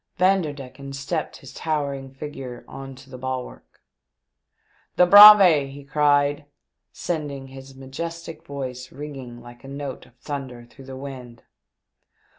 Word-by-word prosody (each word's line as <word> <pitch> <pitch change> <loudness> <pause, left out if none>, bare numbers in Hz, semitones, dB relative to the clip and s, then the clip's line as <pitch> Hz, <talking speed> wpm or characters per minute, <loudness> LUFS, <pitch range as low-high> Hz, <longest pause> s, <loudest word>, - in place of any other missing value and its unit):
Vanderdecken 145 -7 -1
stepped 140 +4 -4
his 130 -2 -13
towering 140 -4 -3
figure 135 -3 -8
on 135 0 -9
to 130 0 -16
the 130 -1 -10
bulwark; 130 -1 -7 0.5
" - - -41
The 180 - +6
Braave," 195 -7 +9
he 140 +1 -11
cried, 145 0 +2 0.5
sending 145 -5 -5
his 135 0 -12
majestic 165 +4 -7
voice 130 -4 -7
ringing 135 -4 -9
like 120 +1 -14
a - - -11
note 140 -2 -7
of 125 - -25
thunder 130 -2 -7
through 130 +3 -16
the 130 0 -9
wind. 130 -4 -9
135 Hz, 130 wpm, -23 LUFS, 130-150 Hz, 0.5 s, Braave